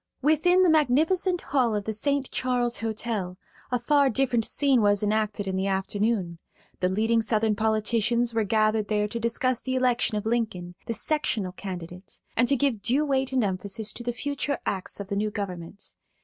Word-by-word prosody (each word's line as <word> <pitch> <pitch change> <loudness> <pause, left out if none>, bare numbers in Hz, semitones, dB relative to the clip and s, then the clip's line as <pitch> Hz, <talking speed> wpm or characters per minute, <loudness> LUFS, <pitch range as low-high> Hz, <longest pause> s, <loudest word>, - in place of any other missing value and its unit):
Within 355 +5 +4
the 360 - +4
magnificent 320 +5 +2
hall 250 -6 +1
of 205 - -2
the 220 - -3
St. 280 +4 0
Charles 245 -2 0
Hotel 220 -5 -3 0.3
a 250 - +2
far 280 +3 +3
different 240 -2 +1
scene 275 -4 +3
was 205 0 +3
enacted 210 -1 -1
in 190 - -2
the 190 +1 -1
afternoon. 195 -2 -1 0.4
The 180 - +1
leading 225 +4 +2
Southern 220 -1 +1
politicians 225 +2 +1
were 225 -1 +1
gathered 215 0 +1
there 210 -1 0
to 230 +3 -5
discuss 235 +2 0
the 260 0 -2
election 245 -3 +1
of 210 - -4
Lincoln, 215 -7 -2
the 230 - -1
"sectional" 225 -12 0
candidate, 180 -1 -8 0.2
and 240 +1 +3
to 280 - +3
give 270 -6 0
due 255 +8 +1
weight 270 -2 0
and 260 -3 +1
emphasis 200 +2 -1
to - - -8
the 240 0 -2
future 285 +2 -3
acts 190 0 -3
of 200 -1 -6
the 200 - -2
new 210 +1 0
government. 195 -2 -7
225 Hz, 180 wpm, -26 LUFS, 205-255 Hz, 0.4 s, Within